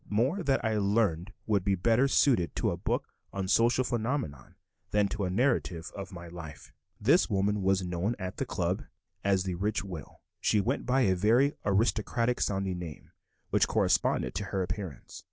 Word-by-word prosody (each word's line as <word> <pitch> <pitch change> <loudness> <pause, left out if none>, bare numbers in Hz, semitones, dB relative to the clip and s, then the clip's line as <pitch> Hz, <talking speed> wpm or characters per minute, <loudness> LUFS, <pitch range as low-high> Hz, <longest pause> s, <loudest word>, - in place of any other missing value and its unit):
More 130 - +1
that 135 -7 +1
I 110 -1 +1
learned 100 -3 +1
would 100 -4 +1
be 100 0 +2
better 115 +8 +3
suited 120 - +3
to - - +1
a - - -2
book - - -2 0.2
on 95 -1 -3
social 120 +5 +3
phenomena 115 - -3 0.3
than 105 -1 +2
to 105 -1 -2
a - - -1
narrative 95 -6 0
of 100 0 -7
my 85 -2 -9
life. 85 -3 -10 0.3
This - - +4
woman 100 +1 +1
was 95 0 +2
known 90 +6 -1
at 95 -1 -5
the - - -1
"Club" - - -1 0.4
as 95 -2 +2
the 95 -1 -2
rich 100 +4 -1
widow. 90 -7 -8 0.2
She 105 - +2
went 120 +8 -1
by 130 +2 +3
a 95 -7 +4
very 115 +10 +3
aristocratic 115 +3 +1
sounding 95 -2 -1
name, 80 -4 -9 0.4
which - - +3
corresponded - - +1
to - - -3
her 95 -1 -1
appearance. 90 - -6
100 Hz, 175 wpm, -29 LUFS, 90-115 Hz, 0.4 s, This